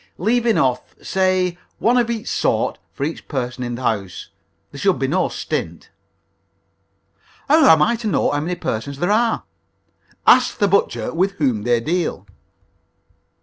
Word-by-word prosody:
Leave 235 +5 +1
enough 130 - 0
say 185 -2 0 0.2
one 235 +2 +2
of 240 -2 +2
each 230 0 -4
sort - - 0
for 140 - -6
each 160 +3 -4
person 125 -3 -4
in 120 0 -4
the 130 - -7
house. 100 -6 -3 0.4
There 140 - -10
should 195 +1 +2
be 135 - -1
no 180 +7 +1
stint." - - -5 1.6
"How 310 +3 +5
am 160 -2 +6
I 235 - +2
to 225 -1 -5
know 210 - +1
how 145 - 0
many 170 +4 -2
persons 140 0 -4
there 175 +7 0
are?" 230 +2 +1 0.8
"Ask - - +5
the 205 - +2
butcher 150 - 0
with 190 +4 +1
whom 130 - 0
they 120 +2 +2
deal." 160 - -2
170 Hz, 155 wpm, -20 LUFS, 130-200 Hz, 1.6 s, am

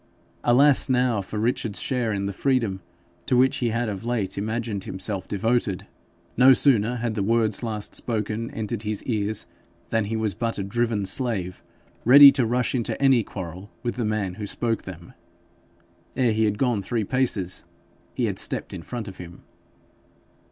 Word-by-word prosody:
Alas 135 +4 +5
now 125 -4 +2
for 100 +3 -7
Richard's 115 -1 -1
share 125 -4 -1
in 100 -1 -2
the 100 - -3
freedom 115 -5 0 0.5
to 125 - +3
which 130 +1 +3
he 120 - 0
had 115 +1 -1
of 100 -1 -5
late 115 -5 -2
imagined 110 -1 -3
himself 95 0 -3
devoted! 105 -2 0 0.5
No 130 +2 +7
sooner 120 -4 +3
had 120 -2 -2
the 105 - -2
words 110 0 +1
last 110 -3 -3
spoken 110 0 -3
entered 110 0 -4
his 105 -1 -3
ears 110 -3 -2 0.5
than 115 -2 +1
he 110 +2 -3
was 110 -2 0
but 115 +5 -2
a 100 - -2
driven 110 0 -1
slave 95 -5 -1 0.4
ready 140 +3 +10
to 130 -4 0
rush 125 +2 0
into 120 -4 -2
any 135 -3 +4
quarrel 95 -1 -8
with 120 - -1
the 120 - -3
man 105 -4 -1
who 105 +2 -6
spoke 115 +2 -2
them. 85 -2 -10 1.0
Ere 125 -3 +2
he 110 0 +2
had 105 -1 0
gone 120 -5 +1
three 115 +3 -2
paces 105 -6 -1 0.5
he - - 0
had - - -2
stepped - - -2
in - - -6
front 115 +4 -6
of 95 - -9
him. 85 -1 -11
110 Hz, 175 wpm, -24 LUFS, 100-120 Hz, 1.0 s, ready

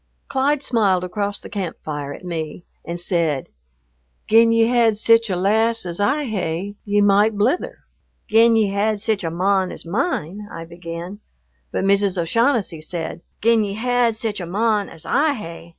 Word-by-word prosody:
Clyde 280 +1 +1
smiled 200 -8 +2
across 200 +2 -3
the - - -10
camp 190 -5 -4
fire 145 -2 -4
at 180 - -9
me 165 -1 -5 0.2
and 170 +1 -5
said, 165 -6 0 0.8
"Gin 230 +1 +5
ye 230 0 +4
had 230 -2 +3
sic 230 +1 +4
a 185 - 0
lass 220 +4 +2
as 175 +1 -5
I 275 +9 +1
hae, 195 - -3
ye 205 0 +2
might 205 +1 +3
blither." 245 - 0 0.5
"Gin 225 +1 +5
ye 215 -3 +3
had 205 +2 0
sic 215 -1 0
a 165 - -1
mon 185 +2 +1
as - - -4
mine 205 - -2
" - - -16
I 165 - -7
began, 170 +3 -8 0.5
but - - -1
Mrs. 200 -1 +2
O'Shaughnessy 205 - +1
said, 165 +1 -4 0.2
"Gin 230 -1 +4
ye 200 -1 -3
had 240 0 +1
sic 220 -2 -3
a 175 - -5
mon 210 +2 0
as 160 - -11
I 300 +1 +2
hae." 170 -7 -8
205 Hz, 175 wpm, -21 LUFS, 175-225 Hz, 0.8 s, Gin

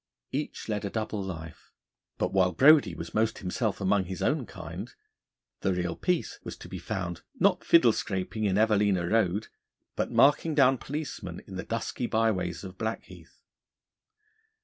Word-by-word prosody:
Each 145 +3 -4
led 105 -2 -2
a 100 - -2
double 110 -1 -3
life; 80 -4 -8 0.5
but - - -1
while 90 -1 +3
Brodie 135 - +6
was 85 - -7
most 110 +1 +1
himself 100 +3 -2
among 95 -1 +2
his 95 -1 -5
own - - +1
kind, - - -7 0.7
the 95 - +1
real 90 -1 -2
Peace 180 -2 -1
was - - -7
to - - -11
be - - -6
found 85 -3 -4 0.2
not - - +3
fiddle 125 -9 +6
scraping 100 +2 -2
in 95 -1 +2
Evelina 105 -5 +3
Road 105 0 +1 0.5
but - - -1
marking 145 +2 +4
down 135 -3 +5
policemen 140 - -5
in 95 - -9
the 95 - -3
dusky 115 +1 -3
byways 100 -7 0
of 95 -1 -9
Blackheath. 110 +1 -6
105 Hz, 155 wpm, -28 LUFS, 95-115 Hz, 0.7 s, Brodie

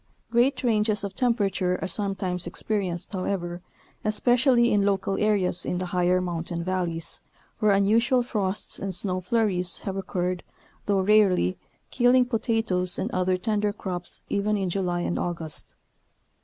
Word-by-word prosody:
Great 245 +4 +2
ranges 215 -3 +1
of 200 -1 -4
temperature 195 -7 0
are - - -3
sometimes 185 -2 -2
expe 210 +4 -2
rienced, 175 0 -3
however, 180 -2 -3 0.4
especially 240 +3 +3
in 205 -1 +3
local 195 -1 0
areas 200 -4 +1
in 180 - -2
the 185 - -2
higher 180 0 +1
mountain 170 -1 -3
valleys, 175 -3 -2 0.4
where 215 -1 +3
unusual 225 +6 +3
frosts 205 -4 0
and 195 -2 -2
snow 185 0 +3
flurries 180 -3 +1
have 195 - -3
occurred, 180 -2 -2 0.5
though 200 -2 +2
rarely, 190 - +3 0.4
killing 250 0 +4
potatoes 225 -6 0
and - - -2
other 185 0 +1
tender 210 +1 0
crops 180 -4 -4
even 210 +1 0
in 190 -3 -2
July 175 -2 -1
and 175 - -2
August. 165 -3 -2
195 Hz, 140 wpm, -25 LUFS, 180-215 Hz, 0.5 s, killing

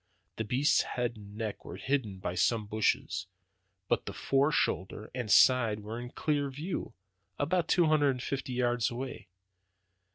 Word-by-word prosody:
The 110 - -1
beast's 130 +7 +3
head 120 -1 -2
and 105 -1 -12
neck 110 -2 -4
were 85 - -8
hidden 110 -2 -1
by 95 -1 -3
some 105 +4 +1
bushes, 110 -2 0 0.6
but - - 0
the - - -4
fore 140 +2 +2
shoulder 100 -4 -1
and 125 -3 -4
side 115 -2 +5
were 110 +3 -6
in 120 0 -6
clear 145 +1 -1
view, 150 -2 -5 0.4
about 165 +3 +1
two 175 - +4
hundred 155 -2 +4
and 125 -2 -2
fifty 135 -1 -3
yards 120 -1 +1
away. 130 +2 -6
125 Hz, 160 wpm, -31 LUFS, 110-140 Hz, 0.6 s, side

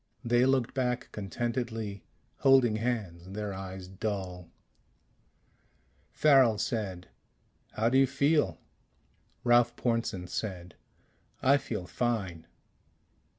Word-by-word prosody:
They 120 +2 +4
looked 130 -3 +1
back 125 -2 -1
contentedly, 110 0 -3 0.3
holding 130 -5 +5
hands, 105 -7 -3
their 105 -1 -4
eyes 95 -1 -7
dull. 95 -3 -4 1.6
Farrel 135 -7 +5
said, 100 -5 -3 0.6
"How 110 +1 +1
do 130 +2 +4
you 135 - +5
feel?" 140 - +2 0.9
Ralph 120 -1 +4
Pornsen 115 -6 -1
said, 90 -3 -5 0.7
"I 140 +2 +6
feel 105 -9 -5
fine." 95 -8 -2
110 Hz, 95 wpm, -30 LUFS, 95-125 Hz, 1.6 s, I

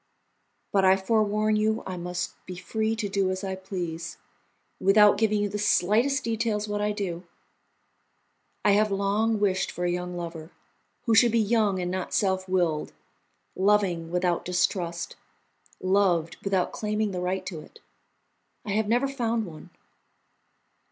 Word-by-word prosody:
"But 195 -1 +3
I 190 0 +6
forewarn 215 +1 +1
you 220 +1 +1
I 185 - -4
must 180 0 -4
be 180 - -6
free 220 +4 -2
to 220 -2 -2
do 195 -1 0
as 185 +1 -3
I 190 -1 -2
please, 175 -3 -5 0.6
without 205 +1 +6
giving 215 -2 +2
you - - +1
the 205 +1 -4
slightest 220 +8 +2
details 225 -2 -1
what 205 0 -2
I 210 0 +1
do. 190 -5 -3 1.4
I 205 - +6
have 210 +1 +3
long 205 +3 +1
wished 190 -2 +1
for 175 - -4
a 175 - +1
young 180 0 -3
lover, 165 -2 -6 0.5
who 230 - +1
should 235 +1 +6
be 230 - +2
young 210 -3 +2
and 180 0 -2
not 185 -1 -3
self 190 -1 0
willed, 175 -5 0 0.6
loving 190 -4 +2
without 180 -1 0
distrust, 175 -1 -1 0.6
loved 185 -3 +2
without 190 -2 0
claiming 210 -1 -1
the 180 -1 -3
right 185 +1 -2
to 170 -5 -5
it. 155 - -15 0.9
I 205 - -3
have 215 +1 +1
never 245 +5 +2
found 235 -4 -1
one. 160 -4 -11
195 Hz, 150 wpm, -26 LUFS, 180-215 Hz, 1.4 s, I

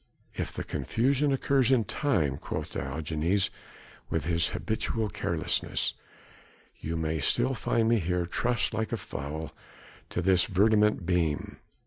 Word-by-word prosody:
"If - - -3
the - - -5
confusion 140 +5 +1
occurs 135 -1 +2
in 125 -4 +4
time," 80 - 0
quoth - - -4
Diogenes 80 +7 0 0.6
with 80 -3 -1
his 85 0 +2
habitual 110 0 -2
carelessness, - - 0 0.9
"you 80 +2 -3
may 80 0 -1
still 120 - +2
find 115 0 +1
me 115 -1 +4
here 90 0 0
trussed 120 +7 0
like 110 0 -2
a 115 - 0
fowl 80 -3 -5 0.6
to 90 - -2
this 95 -1 +4
verdommte 105 0 +3
beam. 85 -4 0
95 Hz, 130 wpm, -29 LUFS, 80-115 Hz, 0.9 s, in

